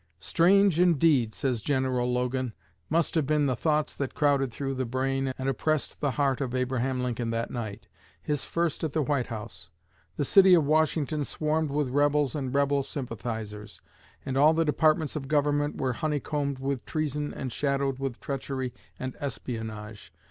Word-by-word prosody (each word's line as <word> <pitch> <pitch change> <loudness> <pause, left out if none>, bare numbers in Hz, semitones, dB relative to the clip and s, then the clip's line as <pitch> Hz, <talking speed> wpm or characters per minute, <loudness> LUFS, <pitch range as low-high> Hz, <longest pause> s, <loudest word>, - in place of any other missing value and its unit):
"Strange 190 0 +4
indeed," 150 -10 +3
says 130 -5 -1
General 130 -2 0
Logan, 125 -1 -1 0.3
"must 165 +1 +1
have 155 -5 +1
been 150 -1 +2
the 130 -2 +1
thoughts 150 +3 0
that 140 -2 -4
crowded 140 -4 +2
through 135 +3 -3
the 130 0 -1
brain 135 +2 -1
and 130 - -3
oppressed 155 +3 -1
the 145 - +2
heart 135 0 0
of 130 -2 -2
Abraham 130 0 0
Lincoln 120 -1 -2
that 115 +1 -2
night 110 -3 -5 0.3
his 150 -2 -2
first 170 -2 -1
at 155 -3 -1
the 155 - +1
White 140 -3 0
House. 110 -2 -7 0.5
The 145 - 0
City 190 +4 +7
of 160 -4 +3
Washington 155 0 +1
swarmed 155 +2 -1
with 145 -1 0
rebels 145 0 +2
and 135 -4 -3
rebel 140 0 +2
sympathizers, 110 -6 -6 0.5
and 135 0 -2
all 150 +3 +6
the 165 0 +2
departments 155 0 +2
of 140 -3 -4
Government 145 0 +1
were 130 -2 0
honeycombed 145 -1 -2
with 135 -1 -2
treason 150 -1 -2
and 130 -2 -5
shadowed 140 0 -1
with 135 -3 -3
treachery 135 -2 -4 0.2
and 130 0 -5
espionage. 110 -6 -6
140 Hz, 165 wpm, -28 LUFS, 125-150 Hz, 0.5 s, City